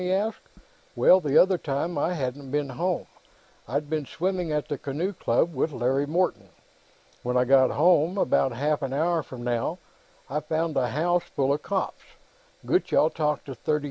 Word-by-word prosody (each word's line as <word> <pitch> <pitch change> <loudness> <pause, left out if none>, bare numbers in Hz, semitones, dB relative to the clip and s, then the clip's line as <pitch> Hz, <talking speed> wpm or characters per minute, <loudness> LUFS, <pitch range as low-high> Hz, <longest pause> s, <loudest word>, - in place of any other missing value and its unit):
he 180 0 -1
asked. 205 +4 -1 0.5
"Well, 185 - +6
the 150 -5 +1
other 185 -1 +5
time, 155 +4 -2
I 150 +5 0
hadn't 135 -1 -4
been 145 0 -1
home: 175 +7 -2 0.6
I'd 145 +5 -2
been 155 -2 -2
swimming 180 -1 -2
at 150 -1 -1
the 145 -4 -4
Canoe 160 +8 -3
Club, 165 +1 +1
with 150 +3 0
Larry 135 +2 0
Morton. 155 - 0 0.7
When 125 +1 -1
I 125 - +3
got 130 0 +5
home, 170 +3 +3
about 135 -6 +2
half 145 +5 -1
an 135 -1 -3
hour 165 +3 +1
from 130 -4 -9
now, 120 +7 -1 0.5
I 145 +3 -2
found 160 +1 -2
the 130 -2 +2
house 170 +8 0
full 135 0 +2
of 150 - -3
cops. 195 -2 -3 0.6
Gutchall 260 - +2
talked 150 -2 -1
the. 145 +3 -2
150 Hz, 175 wpm, -26 LUFS, 135-175 Hz, 0.7 s, Well